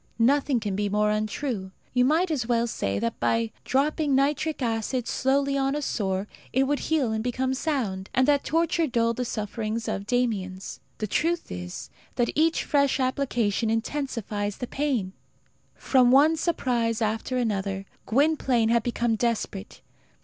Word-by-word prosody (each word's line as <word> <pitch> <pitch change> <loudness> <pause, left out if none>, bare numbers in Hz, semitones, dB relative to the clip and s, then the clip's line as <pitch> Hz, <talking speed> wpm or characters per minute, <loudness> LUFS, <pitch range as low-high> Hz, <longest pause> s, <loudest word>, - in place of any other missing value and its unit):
Nothing 265 +2 +3
can 205 -3 -3
be 205 +1 0
more 210 +1 +2
untrue. 215 -1 -2 0.2
You 250 0 +4
might 325 +6 +2
as 255 -7 -1
well 235 -1 +2
say 100 - -2
that 115 +3 -2
by 115 -1 +1
dropping 290 +1 +1
nitric 295 +3 +1
acid 230 +2 -1
slowly 275 +1 +1
on 270 0 +1
a 295 - -2
sore 190 -6 -1 0.3
it 265 - +3
would 285 +1 0
heal 290 -8 +2
and 220 0 -1
become 255 +2 -1
sound, 245 -10 -2
and 260 +1 +2
that 285 -1 +3
torture 330 +1 +1
dulled 230 -3 +1
the 250 - -1
sufferings 220 +1 -3
of 200 +1 -3
Damiens. 200 -7 -2 0.2
The 215 - -2
truth 330 - -1
is, 90 0 -6 0.2
that 240 -1 +1
each 325 +2 +2
fresh 280 -2 +2
application 245 -5 0
intensifies 225 -4 -2
the 250 - -3
pain. 250 -9 -1 0.6
From 255 -2 +3
one 290 +5 +6
surprise 245 -9 0
after 220 +4 -1
another, 195 -4 -1 0.2
Gwynplaine 265 -3 +2
had 235 0 +3
become 235 0 0
desperate. 220 -3 -2
240 Hz, 155 wpm, -26 LUFS, 215-275 Hz, 0.6 s, one